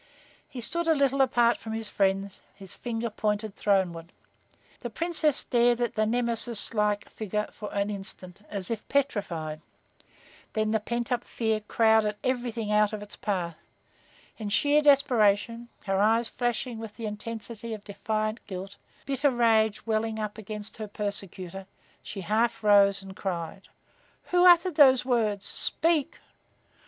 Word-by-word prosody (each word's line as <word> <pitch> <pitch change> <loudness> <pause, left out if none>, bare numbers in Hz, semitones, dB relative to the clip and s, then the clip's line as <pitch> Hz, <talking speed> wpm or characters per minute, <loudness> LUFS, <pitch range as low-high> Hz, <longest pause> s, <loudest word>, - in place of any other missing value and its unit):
He 250 - -7
stood 340 +8 -2
a 320 - +4
little 275 -1 +2
apart 240 -2 +3
from 220 - -7
his 225 -1 -3
friends, 195 0 0
his 195 -2 -9
finger 235 -1 -3
pointed 210 -1 -2
throneward. 180 -4 0 0.7
The 240 - -5
Princess 315 +2 +1
stared 240 0 +2
at 240 -2 0
the 215 0 +1
nemesis 235 -1 -1
like 210 -1 +1
figure 210 0 -3
for 210 - -8
an 200 +1 -1
instant, 195 -2 -6
as 200 0 -3
if 225 -2 -4
petrified. 175 - -1 0.9
Then 215 -1 0
the 220 - +2
pent 235 +3 -3
up 245 -1 0
fear 220 -2 -1
crowded 220 0 +3
everything 240 -4 -1
out 210 0 +3
of 210 -1 -4
its 210 - -11
path. 175 -6 -2 0.8
In 215 -2 -4
sheer 290 +8 +3
desperation, 235 -5 +3 0.2
her 195 -1 +1
eyes 225 +3 +3
flashing 240 -1 -2
with 225 -2 -8
the 230 - -5
intensity 220 +1 -6
of 205 - -12
defiant 215 +2 -2
guilt, 190 +1 -7 0.3
bitter 275 +1 +2
rage 220 -4 +2
welling 220 0 0
up 215 0 -4
against 210 0 -7
her 215 -1 -5
persecutor, 195 -2 -6 0.3
she 195 - -7
half 220 +5 0
arose 200 -1 +5
and 190 0 -10
cried: 180 0 -4 0.6
"Who 360 0 +6
uttered 355 +1 +6
those 265 -4 +7
words? 215 -6 0
Speak!" 325 -2 0
220 Hz, 145 wpm, -27 LUFS, 205-240 Hz, 0.9 s, those